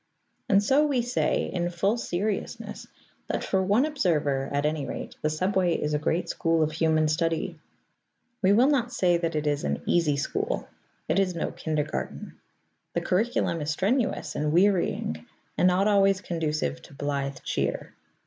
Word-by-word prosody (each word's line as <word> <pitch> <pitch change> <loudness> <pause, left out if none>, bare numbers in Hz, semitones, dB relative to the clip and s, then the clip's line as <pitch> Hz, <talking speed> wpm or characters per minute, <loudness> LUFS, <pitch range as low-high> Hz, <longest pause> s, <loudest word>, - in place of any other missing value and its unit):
And 200 +1 +5
so 280 +7 +4
we 260 -5 +1
say, 245 +1 0
in 175 -1 0
full 195 +5 +1
seriousness, 205 -2 -3 0.4
that - - -2
for 190 - +1
one 205 +8 +3
observer 150 - 0
at 145 +1 0
any 150 -1 0
rate - - -6
the 155 - +1
subway 185 +2 +1
is 150 0 -1
a 150 - +1
great 160 +3 0
school 165 -1 +1
of 155 - 0
human 155 0 +2
study. 165 +2 -1 0.8
We 190 - +4
will 230 +5 +5
not 260 -4 +2
say 175 -5 +2
that 165 -1 -2
it 150 0 -1
is 145 -1 0
an 70 0 -2
easy 155 -5 +2
school: 140 - -2 0.4
it - - +2
is 185 -2 +1
no 165 - -2
kindergarten; 155 -2 -4 0.6
the - - +1
curriculum 185 -4 0
is 150 - -3
strenuous 195 - 0
and 150 0 0
wearying, 175 - +1 0.3
and 180 - +3
not 185 +3 +3
always 195 -2 +4
conducive 155 - -2
to 140 - -15
blithe 140 -1 -2
cheer. - - -2
170 Hz, 165 wpm, -27 LUFS, 150-195 Hz, 0.8 s, And